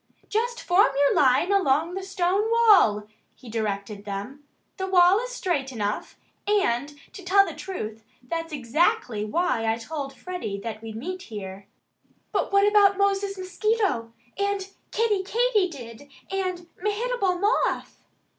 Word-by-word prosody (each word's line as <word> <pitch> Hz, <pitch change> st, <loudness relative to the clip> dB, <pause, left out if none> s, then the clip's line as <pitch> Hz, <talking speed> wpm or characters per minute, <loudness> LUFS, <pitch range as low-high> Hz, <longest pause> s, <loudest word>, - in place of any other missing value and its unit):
"Just 475 Hz, +3 st, -1 dB
form 360 Hz, +3 st, +4 dB
your 285 Hz, 0 st, +4 dB
line 275 Hz, +8 st, +3 dB
along 330 Hz, -3 st, +2 dB
the 385 Hz, -, -3 dB
stone 385 Hz, +2 st, 0 dB
wall" 415 Hz, -, +5 dB, 0.3 s
he 250 Hz, -, -13 dB
directed 205 Hz, -2 st, -3 dB
them. 210 Hz, +8 st, -6 dB, 0.3 s
"The 380 Hz, -1 st, -3 dB
wall 370 Hz, +1 st, +5 dB
is -, -, -5 dB
straight 345 Hz, -, -2 dB
enough. 210 Hz, -4 st, -3 dB, 0.3 s
And 290 Hz, -, +1 dB, 0.2 s
to 390 Hz, -, -9 dB
tell 395 Hz, +2 st, +5 dB
the -, -, -6 dB
truth, 220 Hz, -, -6 dB, 0.2 s
that's 330 Hz, +5 st, -4 dB
exactly 280 Hz, -, 0 dB
why 225 Hz, -3 st, 0 dB
I 225 Hz, -, -1 dB
told 275 Hz, +3 st, -5 dB
Freddie 360 Hz, -, -5 dB
that 220 Hz, -1 st, -6 dB
we'd 225 Hz, -1 st, -8 dB
meet 365 Hz, +11 st, -5 dB
here." 195 Hz, -2 st, -8 dB, 0.6 s
"But -, -, -1 dB
what 400 Hz, +1 st, +5 dB
about 405 Hz, -2 st, +5 dB
Moses 400 Hz, 0 st, +1 dB
Mosquito 375 Hz, -, -1 dB, 0.3 s
and 400 Hz, -1 st, -1 dB, 0.2 s
Kiddie 425 Hz, -3 st, +1 dB
Katydid 365 Hz, -, -1 dB, 0.2 s
and 370 Hz, -3 st, -3 dB
Mehitable 420 Hz, -2 st, 0 dB
Moth?" 405 Hz, +3 st, 0 dB
355 Hz, 135 wpm, -25 LUFS, -, 0.6 s, wall